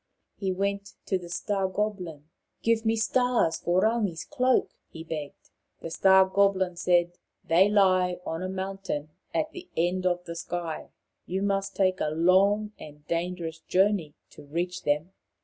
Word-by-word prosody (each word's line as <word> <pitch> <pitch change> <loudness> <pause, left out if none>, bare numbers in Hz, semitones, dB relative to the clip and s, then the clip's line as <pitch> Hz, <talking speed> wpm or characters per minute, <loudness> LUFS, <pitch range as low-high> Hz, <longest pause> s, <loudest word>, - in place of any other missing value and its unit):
He 195 -2 -2
went 200 +1 -2
to 190 - 0
the 175 -1 -10
Star 195 +2 -1
goblin. 185 -7 -3 0.2
" - - -52
Give 230 -1 +2
me 225 - +3
stars 235 -5 +2
for 180 +2 +1
Rangi's 210 -7 0
cloak," 255 -3 +1 0.2
he 160 - -9
begged. 155 -3 -7 0.3
The 165 - -6
Star 190 +2 +6
goblin 190 -2 +2
said, 175 0 +1
" - - -54
They 180 +5 +5
lie 185 -3 +3
on 165 -1 -3
a 185 - -3
mountain 190 -5 -4 0.2
at 310 0 -1
the 360 +2 -10
end 180 +2 +1
of 180 0 -1
the 170 - -6
sky. 170 -1 -4 0.4
You 190 +2 -2
must 195 -1 -1
take 185 -1 +2
a 150 - +1
long 190 +6 +3
and 150 0 -12
dangerous 170 -1 -3
journey 185 -4 +1 0.2
to - - -13
reach 175 +5 -3
them." 150 +5 0
185 Hz, 165 wpm, -27 LUFS, 170-200 Hz, 0.4 s, Star